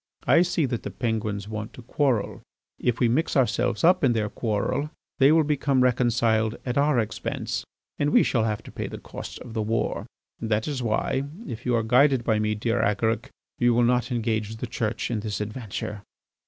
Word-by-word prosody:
"I - - +5
see 175 -3 +1
that 120 -3 -2
the - - -5
Penguins 110 -4 -2
want 110 0 -5
to 125 - -11
quarrel. 125 -4 0 0.4
If 125 -1 0
we 125 - +4
mix 145 +6 +1
ourselves 120 -4 +1
up 175 0 +5
in 130 -3 +4
their 105 -2 0
quarrel 110 +7 -1 0.3
they 135 +2 +6
will 160 0 +5
become 140 -3 +1
reconciled 115 -3 +2
at 125 -1 -2
our 145 -1 +3
expense 110 - -2 0.4
and 145 - +2
we - - +5
shall 115 -4 +1
have 105 -2 -2
to - - -11
pay - - -4
the - - -7
cost - - -8
of 120 - -9
the 110 - -1
war. 115 +2 -1 0.3
That 110 -1 -1
is 140 -4 -2
why, 125 +4 0 0.2
if 125 -2 -6
you 125 - +3
are 115 - +1
guided 125 +2 +4
by 110 -2 +2
me, 105 0 0
dear 115 +2 0
Agaric, 110 +2 0 0.3
you 120 -1 +4
will 120 - +4
not 125 +2 +2
engage 110 -2 -1
the 110 - -5
Church 115 0 -2
in 115 - 0
this 105 -2 -3
adventure." 105 -1 -5
115 Hz, 195 wpm, -25 LUFS, 110-130 Hz, 0.4 s, they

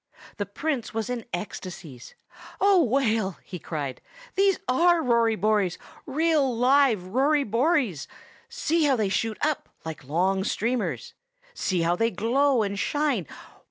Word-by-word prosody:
The 205 -3 -3
Prince 255 +2 -3
was 225 +1 -2
in 240 -3 -4
ecstasies. 175 -8 -7 0.4
"Oh, 390 -3 +5
Whale!" 225 - 0
he 180 - -8
cried, 145 -7 -5 0.3
"these 390 0 +3
are 345 +7 +4
Rory 235 -2 +3
Bories, 205 -3 +1 0.3
real 290 -3 +1
live 255 -5 +4
Rory 275 +9 +2
Bories! 240 - 0 0.4
See 335 -9 0
how 275 -2 +3
they 215 -5 0
shoot 220 +2 -1
up, 305 -1 -2 0.2
like 160 -3 -6
long 185 +7 0
streamers! 235 +4 -2 0.4
See 185 - -1
how 170 +1 +2
they 225 +5 +1
glow 240 +5 +2
and 200 0 -3
shine! 280 - 0
230 Hz, 135 wpm, -25 LUFS, 190-285 Hz, 0.4 s, Oh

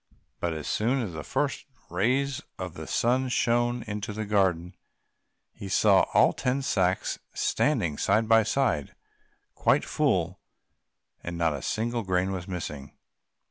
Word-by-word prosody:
But 85 -1 -1
as 75 -2 -6
soon 120 +5 +1
as 95 -6 -5
the 80 - -5
first 135 - -2 0.2
rays 130 +5 +1 0.2
of - - -5
the - - -8
sun 130 +2 +1
shone 120 0 +1
into 105 0 -5
the 110 +1 -4
garden 95 -4 +1 0.8
he 100 - -8
saw - - +4
all - - +6
the - - -10
ten 130 +2 0
sacks 95 -6 0 0.2
standing 100 - 0
side 110 +1 +2
by 115 0 +6
side, 115 - 0 0.6
quite - - +2
full, - - 0 0.8
and 85 0 -5
not 85 -2 +1
a - - -5
single 115 +2 -1
grain 95 -1 0
was 95 -1 -5
missing. 75 -7 -6
105 Hz, 145 wpm, -27 LUFS, 90-120 Hz, 0.8 s, all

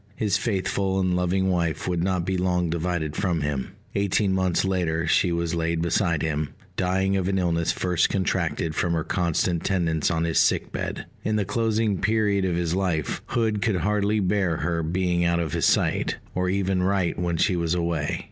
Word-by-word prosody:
His 105 -2 0
faithful 95 -2 0
and 90 -1 +1
loving 95 +1 +1
wife 85 -3 -1
would 90 -2 0
not 90 -2 0
be 95 - -1
long 90 -2 0
divided 85 -2 -2
from 85 -3 0
him. 70 -3 -3 0.2
Eighteen 100 0 +1
months 95 -1 +1
later 85 -4 0
she 90 +2 +3
was 85 0 -1
laid 85 0 0
beside 85 -3 +1
him, 75 -2 -1 0.3
dying 95 +1 +1
of 95 -2 0
an 95 0 0
illness 85 -2 +1
first 90 -2 +1
contracted 85 -5 -1
from 85 +2 0
her 80 -1 0
constant 85 -1 0
tendance 85 -5 +1
on 80 -2 0
his 85 -1 +1
sick - - +2
bed. - - -4 0.2
In 110 - 0
the 105 -2 +1
closing 110 -2 0
period 105 -2 +2
of 90 -2 0
his 85 -1 -1
life, 90 -6 -1
Hood 110 -3 0
could 105 0 +1
hardly 105 +2 +1
bear 95 -4 +1
her 85 +2 -1
being 85 +1 0
out 85 0 +2
of 80 -4 -2
his - - +2
sight, - - +1 0.2
or 90 0 0
even 95 -1 0
write 95 -2 0
when 85 -1 -1
she 90 +3 +2
was 85 0 0
away. 85 -3 -1
90 Hz, 190 wpm, -25 LUFS, 85-95 Hz, 0.3 s, she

